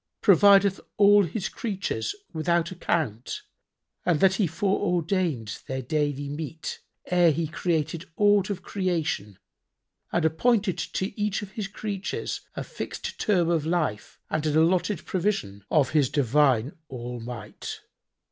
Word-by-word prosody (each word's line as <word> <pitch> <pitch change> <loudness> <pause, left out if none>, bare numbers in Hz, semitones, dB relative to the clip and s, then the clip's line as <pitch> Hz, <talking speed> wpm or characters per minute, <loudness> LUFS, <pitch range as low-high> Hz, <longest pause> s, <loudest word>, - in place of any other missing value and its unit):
provideth 200 0 +6 0.2
all 205 -1 +6
His 190 +4 -3
creatures 215 - -3 0.2
without 170 +1 +1
account 155 - -2 0.6
and 170 -4 +2
that 190 +2 +5
He 195 -1 +1
fore 190 +5 0
ordained 170 - 0
their 130 0 -3
daily 145 +1 -1
meat 155 +2 -5 0.3
ere 175 -2 +4
He 165 +2 -1
created 165 +1 -2
aught 205 -2 +4
of 200 - -4
creation 160 - -2 0.7
and 170 - +1
appointed 190 +2 +2
to 195 +5 -3
each 205 0 0
of 195 - -9
His 210 -1 -4
creatures 200 0 -4
a - - -3
fixed - - -6
term 180 -5 +2
of 165 -3 +1
life 155 -10 -1
and 155 - -1
an 155 0 +2
allotted 175 +3 +2
provision, 170 - -1
of 140 -5 +3
His 145 -5 +3
divine 140 -2 +3 0.2
All 125 -1 -6
might? 115 -3 -7
170 Hz, 135 wpm, -26 LUFS, 145-195 Hz, 0.7 s, provideth